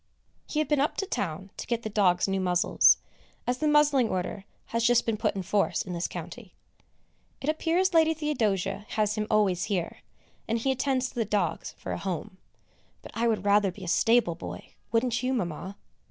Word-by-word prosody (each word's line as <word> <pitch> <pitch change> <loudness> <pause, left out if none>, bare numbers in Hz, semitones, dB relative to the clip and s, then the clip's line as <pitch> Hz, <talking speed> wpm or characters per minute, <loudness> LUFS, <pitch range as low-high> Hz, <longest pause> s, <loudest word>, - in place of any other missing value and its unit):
He - - -5
had 310 - +2
been 295 -2 +2
up 290 - 0
to 390 - -1
town 190 - -4
to - - -6
get 235 -1 -1
the - - -3
dogs 185 -4 +3
new 195 0 0
muzzles, 180 -1 +4 0.5
as 250 +1 -1
the 310 - +1
muzzling 295 -5 +4
order 185 +2 -3 0.3
has 230 0 +1
just 240 0 +4
been 225 - 0
put 215 -1 -1
in 190 - -3
force 200 +2 +1
in 185 - -6
this 170 0 -2
county. 180 +4 -9 0.8
It 275 - -6
appears 340 +4 +1
Lady 320 -1 +4
Theodosia 210 - -1
has 210 -1 +2
him 210 0 -2
always 195 -5 +2
here, 185 -5 -2 0.5
and 230 - 0
he 265 +4 0
attends 260 -1 0
to - - -16
the 235 - 0
dogs 200 -5 -1
for - - -6
a - - -3
home, 185 0 -5 0.6
but - - -10
I 235 +1 0
would 215 -4 0
rather 200 -1 +4
be 190 +2 -11
a - - -6
stable 225 0 +3
boy, 165 - -9 0.2
wouldn't 235 +1 +1
you, 260 +1 0
Mamma? 185 -2 -4
215 Hz, 195 wpm, -27 LUFS, 190-255 Hz, 0.8 s, muzzles